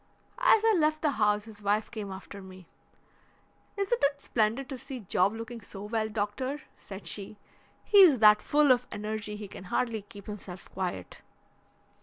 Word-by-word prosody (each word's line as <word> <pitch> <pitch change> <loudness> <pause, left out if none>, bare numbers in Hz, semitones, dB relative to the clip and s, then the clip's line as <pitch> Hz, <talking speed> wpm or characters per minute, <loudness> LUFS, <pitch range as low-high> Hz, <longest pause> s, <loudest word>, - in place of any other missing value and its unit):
As 445 -3 +5
I 445 - +5
left 310 -1 +1
the 300 - +3
house 210 -3 +1
his 215 -1 -11
wife 210 +1 0
came 210 -4 -6
after 195 +1 -9
me. 185 -2 -13 1.1
'Isn't 400 +2 0
it 280 0 +2
splendid 230 +1 0
to 265 - -5
see 265 -1 -7
Job 190 0 +2
looking 230 +1 -7
so 200 -1 -9
well, 220 +1 -1
doctor,' 220 +7 -3
said 195 -2 -10
she; 200 +4 -4 0.5
'he's 380 -9 +7
that 210 -1 +6
full 295 -2 +4
of 250 0 +2
energy 210 0 -4
he 210 -1 -7
can 190 - -10
hardly 225 +3 -1
keep 205 -1 -13
himself 190 -4 -9
quiet.' 180 - -5
215 Hz, 165 wpm, -29 LUFS, 205-265 Hz, 1.1 s, he's